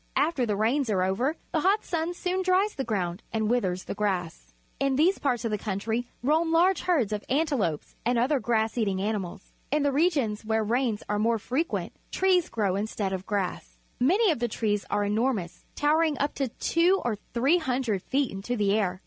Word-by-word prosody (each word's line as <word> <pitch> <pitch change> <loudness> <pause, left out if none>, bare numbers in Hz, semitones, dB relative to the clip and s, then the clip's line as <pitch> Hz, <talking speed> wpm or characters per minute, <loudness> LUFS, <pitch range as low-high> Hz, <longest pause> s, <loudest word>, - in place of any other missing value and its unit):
After 290 -6 +1
the 210 - 0
rains 235 +5 +1
are 190 -3 +2
o\'er, 240 - 0 0.2
the 325 - +1
hot 390 +6 +2
sun 335 +1 -2
soon 365 +1 -1
dries 375 +3 +2
the 270 - -3
ground 185 -5 -2
and 220 -1 0
vvitliers 190 -6 0
the - - -4
grass. 180 - -2 0.3
In 275 -1 +1
these 340 +8 +3
parts 245 -5 0
of 225 - -1
the 210 - -1
country 220 +4 -2 0.2
roam 320 +5 +2
large 355 +3 +4
herds 270 - +1
of 210 - -3
antelopes 265 - 0
and 245 +1 +1
other 265 +4 +2
grass 225 0 0
eating 200 -4 0
animals. 195 -2 -4 0.2
In 295 0 +1
the 285 - +2
regions 275 -9 +1
where 220 0 0
rains 230 0 0
are 210 0 0
more 230 +2 +2
frequent, 270 - -2 0.2
trees 370 -2 +2
grow 200 -4 0
instead 200 -1 -2
of 190 0 -5
grass. 180 - -3 0.2
Alany 380 - +4
of 300 - -2
the 240 - 0
trees 210 -3 -1
are 205 - +1
enormous, 210 -3 -1
towering 305 0 +2
up 285 +3 0
two 335 +8 +1
or 235 -3 +1 0.2
three 275 +9 +3
hundred 250 - -1
feet 270 +6 0
into 195 +6 -3
the 200 -2 +2
air. 190 -4 0
235 Hz, 190 wpm, -27 LUFS, 205-300 Hz, 0.3 s, large